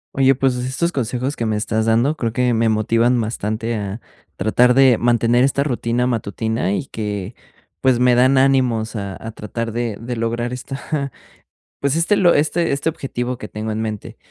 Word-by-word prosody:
Oye, 135 Hz, 0 st, +4 dB
pues, 130 Hz, -1 st, +1 dB
estos 130 Hz, +7 st, -1 dB
consejos 130 Hz, +1 st, -2 dB
que 115 Hz, -, -2 dB
me 110 Hz, -1 st, 0 dB
estás 110 Hz, +1 st, -1 dB
dando 120 Hz, +7 st, +2 dB
creo 115 Hz, -2 st, -2 dB
que 125 Hz, 0 st, +1 dB
me 115 Hz, 0 st, +2 dB
motivan 115 Hz, +3 st, +2 dB
bastante 110 Hz, +1 st, -3 dB
a 105 Hz, +1 st, -4 dB, 0.3 s
tratar 125 Hz, +3 st, +3 dB
de 130 Hz, -2 st, +5 dB
mantener 120 Hz, +1 st, +3 dB
esta 140 Hz, +1 st, +1 dB
rutina 125 Hz, -3 st, -1 dB
matutina 110 Hz, -4 st, -1 dB
y 130 Hz, -, -3 dB
que, 105 Hz, -1 st, -4 dB, 0.5 s
pues, 130 Hz, -2 st, +3 dB
me 125 Hz, -1 st, +4 dB
dan 130 Hz, +2 st, +4 dB
ánimos 125 Hz, -5 st, +2 dB
a 100 Hz, -2 st, -5 dB
a 115 Hz, -, -4 dB
tratar 115 Hz, +2 st, -5 dB
de 115 Hz, -1 st, -2 dB
de 120 Hz, +1 st, -4 dB
lograr 120 Hz, +1 st, -2 dB
esta, 140 Hz, +2 st, -4 dB, 0.7 s
pues, 140 Hz, 0 st, +1 dB
este 165 Hz, +6 st, +2 dB
lo 175 Hz, -3 st, +5 dB
este 155 Hz, +3 st, +1 dB
este 140 Hz, +3 st, -1 dB
objetivo 125 Hz, -5 st, -3 dB
que 105 Hz, -, -8 dB
tengo 110 Hz, +1 st, -5 dB
en 110 Hz, +1 st, -2 dB
mente. 110 Hz, -2 st, -5 dB
120 Hz, 180 wpm, -20 LUFS, 110-130 Hz, 0.7 s, de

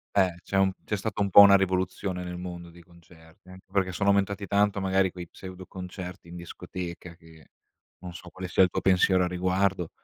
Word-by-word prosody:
Eh, 95 Hz, -3 st, +3 dB
c'è 95 Hz, -, -4 dB
un 95 Hz, 0 st, +3 dB
c'è 105 Hz, -, -2 dB
stata 105 Hz, 0 st, -3 dB
un 100 Hz, -, -1 dB
po' -, -, +6 dB
una 100 Hz, -1 st, +9 dB
rivoluzione 95 Hz, -1 st, -2 dB
nel 90 Hz, 0 st, -6 dB
mondo 85 Hz, -1 st, -8 dB
dei 85 Hz, 0 st, -16 dB
concerti. 85 Hz, 0 st, -20 dB
Anche 95 Hz, 0 st, -14 dB
perché, 95 Hz, -2 st, 0 dB
sono 100 Hz, +2 st, -1 dB
aumentati 100 Hz, 0 st, +1 dB
tanto, 100 Hz, -1 st, +1 dB
magari, 95 Hz, -1 st, +1 dB
quei 90 Hz, -2 st, -9 dB
pseudo 95 Hz, -1 st, -11 dB
concerti 90 Hz, -1 st, -9 dB
in 85 Hz, -, -10 dB
discoteca, 85 Hz, 0 st, -8 dB
che 80 Hz, -2 st, -19 dB, 0.5 s
non 90 Hz, -1 st, -9 dB
so 90 Hz, +1 st, -11 dB
quale 95 Hz, -1 st, -7 dB
sia 95 Hz, -, +4 dB
il 90 Hz, -, 0 dB
tuo -, -, -2 dB
pensiero 95 Hz, 0 st, +3 dB
a 90 Hz, -, 0 dB
riguardo 90 Hz, 0 st, 0 dB
90 Hz, 205 wpm, -27 LUFS, 90-95 Hz, 0.5 s, una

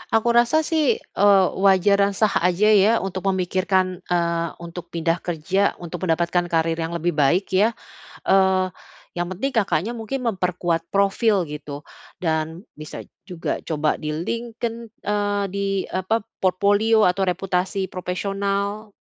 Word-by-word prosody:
aku 225 Hz, +1 st, +2 dB
rasa 240 Hz, +7 st, +3 dB
sih, 325 Hz, +9 st, +1 dB
eee, 200 Hz, -2 st, +4 dB, 0.2 s
wajar 200 Hz, +1 st, +4 dB
dan 200 Hz, 0 st, +2 dB
sah 215 Hz, +1 st, +2 dB, 0.2 s
aja 205 Hz, +5 st, +3 dB
ya 205 Hz, +1 st, +5 dB
untuk 190 Hz, 0 st, -4 dB
memikirkan, 185 Hz, 0 st, 0 dB
eee, 170 Hz, -1 st, 0 dB
untuk 170 Hz, 0 st, -9 dB
pindah 165 Hz, +1 st, -1 dB
kerja 180 Hz, +4 st, 0 dB
untuk 175 Hz, +1 st, -5 dB
mendapatkan 170 Hz, +2 st, +1 dB
karier 165 Hz, 0 st, 0 dB
yang 165 Hz, +1 st, -3 dB
lebih 170 Hz, +1 st, 0 dB
baik 160 Hz, +6 st, +1 dB
ya, 210 Hz, +5 st, +3 dB, 0.5 s
eee, 190 Hz, -1 st, +4 dB, 0.5 s
yang 175 Hz, +1 st, -3 dB
penting 265 Hz, +9 st, -3 dB
Kakaknya 200 Hz, 0 st, 0 dB
mungkin 240 Hz, +3 st, -4 dB
memperkuat 180 Hz, -5 st, -1 dB
profil 200 Hz, -1 st, +2 dB
gitu 145 Hz, -1 st, -8 dB, 0.3 s
dan 160 Hz, +2 st, -2 dB
bisa 155 Hz, 0 st, -9 dB, 0.3 s
juga 170 Hz, -2 st, -3 dB
coba 155 Hz, -1 st, 0 dB
di 155 Hz, -1 st, -5 dB
LinkedIn 230 Hz, +7 st, -3 dB, 0.3 s
eee, 205 Hz, -1 st, 0 dB
di 200 Hz, 0 st, -1 dB, 0.2 s
apa 190 Hz, +5 st, -1 dB
p 205 Hz, -, -17 dB, 0.2 s
portofolio 205 Hz, +4 st, +3 dB
atau 180 Hz, +2 st, +1 dB
reputasi 190 Hz, +1 st, -1 dB
profesional, 200 Hz, +3 st, -3 dB
190 Hz, 140 wpm, -22 LUFS, 170-205 Hz, 0.5 s, ya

